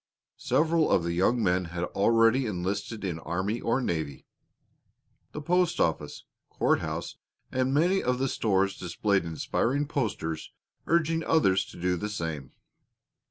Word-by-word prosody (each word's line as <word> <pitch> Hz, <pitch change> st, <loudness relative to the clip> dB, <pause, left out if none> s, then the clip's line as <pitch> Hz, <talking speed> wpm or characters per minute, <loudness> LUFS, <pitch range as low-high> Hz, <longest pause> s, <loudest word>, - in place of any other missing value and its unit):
Several 160 Hz, 0 st, +2 dB
of 85 Hz, -, +3 dB
the 85 Hz, 0 st, -1 dB
young 110 Hz, +7 st, +2 dB
men 90 Hz, -1 st, +2 dB
had 85 Hz, +1 st, -4 dB
already 115 Hz, +6 st, +3 dB
enlisted 100 Hz, +3 st, -3 dB
in 85 Hz, -4 st, -3 dB
army 95 Hz, +8 st, -2 dB
or 115 Hz, +3 st, +1 dB
navy. 80 Hz, -, -3 dB, 1.1 s
The 150 Hz, -, -7 dB
post 180 Hz, +2 st, +1 dB
office, 75 Hz, -2 st, -1 dB, 0.3 s
courthouse, -, -, -1 dB, 0.3 s
and 130 Hz, 0 st, 0 dB
many 175 Hz, +7 st, +3 dB
of 125 Hz, 0 st, 0 dB
the 135 Hz, +1 st, 0 dB
stores 100 Hz, -5 st, +1 dB
displayed 95 Hz, +2 st, 0 dB
inspiring 125 Hz, -, -1 dB
posters 90 Hz, -, -3 dB, 0.3 s
urging 165 Hz, 0 st, +2 dB
others 95 Hz, -15 st, +3 dB
to -, -, -12 dB
do 90 Hz, +1 st, 0 dB
the 105 Hz, +5 st, -3 dB
same. 80 Hz, -9 st, -4 dB
100 Hz, 135 wpm, -28 LUFS, 85-135 Hz, 1.1 s, of